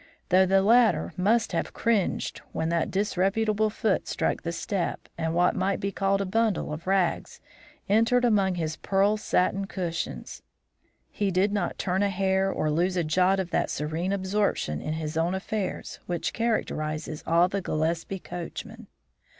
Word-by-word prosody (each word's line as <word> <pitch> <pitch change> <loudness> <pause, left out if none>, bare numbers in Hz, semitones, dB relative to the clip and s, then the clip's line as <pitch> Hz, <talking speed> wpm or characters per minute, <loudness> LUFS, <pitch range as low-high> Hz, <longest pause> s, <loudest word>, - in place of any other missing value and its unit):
Though 185 +1 +5
the 195 +1 +4
latter 230 +2 +4
must 215 +5 +2
have - - -2
cringed 225 -5 0
when 160 - -1
that 170 -1 0
disreputable 210 +2 +1
foot 215 -1 0
struck - - -1
the 170 - -3
step 170 +2 -3
and 160 0 -2
what 175 +1 +3
might 190 +1 0
be 200 - -2
called 195 0 +1
a - - -1
bundle 215 -5 0
of 160 +4 -8
rags 190 -2 0 0.5
entered 230 +4 +3
among 200 -5 +2
his 160 -2 -3
pearl 200 +2 +2
satin 195 -2 0
cushions, 175 -4 -4 0.7
he 205 -1 -1
did 190 +2 +2
not 200 -4 -1
turn 190 +1 0
a 205 - +2
hair 190 0 +1
or 155 - -1
lose 180 +4 +1
a 175 - +2
jot 185 +5 +2
of 185 -2 -3
that - - +1
serene 160 +5 -2
absorption 190 - 0
in 155 - -3
his 155 0 -4
own 170 +3 +1
affairs 190 0 -4
which 175 -1 -2
characterises 155 -9 -2
all 170 +2 +4
the 195 +1 -2
Gillespie 165 +3 -1
coachmen. 175 -2 -8
190 Hz, 160 wpm, -27 LUFS, 170-200 Hz, 0.7 s, Though